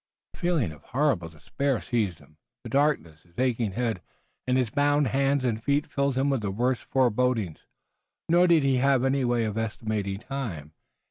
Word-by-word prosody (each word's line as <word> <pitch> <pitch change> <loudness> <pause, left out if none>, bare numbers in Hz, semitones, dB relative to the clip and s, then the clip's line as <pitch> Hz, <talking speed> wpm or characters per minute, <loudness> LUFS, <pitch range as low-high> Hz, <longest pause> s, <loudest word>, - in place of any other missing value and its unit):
A - - -13
feeling 170 - +1
of 75 -2 -13
horrible 125 - 0
despair 125 - -2
seized 110 -8 -1
him. 75 - -21 0.3
The - - -8
darkness, 135 - +1
his 85 0 -28
aching 120 -5 0
head, 115 -5 -1 0.5
and 130 0 +2
his 125 -4 0
bound 145 -2 +2
hands 135 +1 +1
and 110 -2 -1
feet 145 +3 +1
filled 140 -1 -1
him 135 +2 +1
with 135 -4 0
the 105 - -2
worst 120 +5 -1
forebodings. 125 - 0 0.6
Nor 175 +2 +5
did 165 -4 +4
he 135 -1 +2
have 135 0 +3
any 135 0 +1
way 120 -1 +1
of 110 0 -2
estimating 110 -3 -2
time. 110 - -6
125 Hz, 180 wpm, -26 LUFS, 105-140 Hz, 0.6 s, Nor